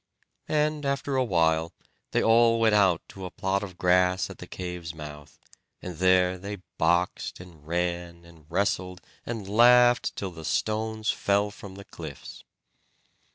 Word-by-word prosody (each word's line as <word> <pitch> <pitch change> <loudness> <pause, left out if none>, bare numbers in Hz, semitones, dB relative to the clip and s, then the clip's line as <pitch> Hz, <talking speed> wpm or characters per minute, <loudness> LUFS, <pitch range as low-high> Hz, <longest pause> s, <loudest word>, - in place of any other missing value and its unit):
And 150 0 0
after 140 0 -1
a 130 - +3
while 80 -6 +1 0.4
they - - +1
all 115 0 +4
went 110 -1 +3
out 95 -5 +3
to 95 - -10
a - - -5
plot 95 +1 -1
of 95 -4 -8
grass 90 +1 +2
at - - -12
the - - -9
cave's 90 -3 -6
mouth, 75 -1 -10 0.4
and 90 -3 -8
there 90 0 +3
they 100 0 -7 0.2
boxed, 85 +2 0
and 85 -4 -14
ran, 85 0 -3
and 80 -3 -18
wrestled, 90 0 -1 0.3
and 115 -4 -5
laughed 120 +3 +5
till 95 -2 -4
the 80 -2 -10
stones 110 +4 -1
fell 100 +1 0
from 95 -1 -11
the 100 0 -11
cliffs. - - -10
95 Hz, 155 wpm, -26 LUFS, 85-110 Hz, 0.4 s, laughed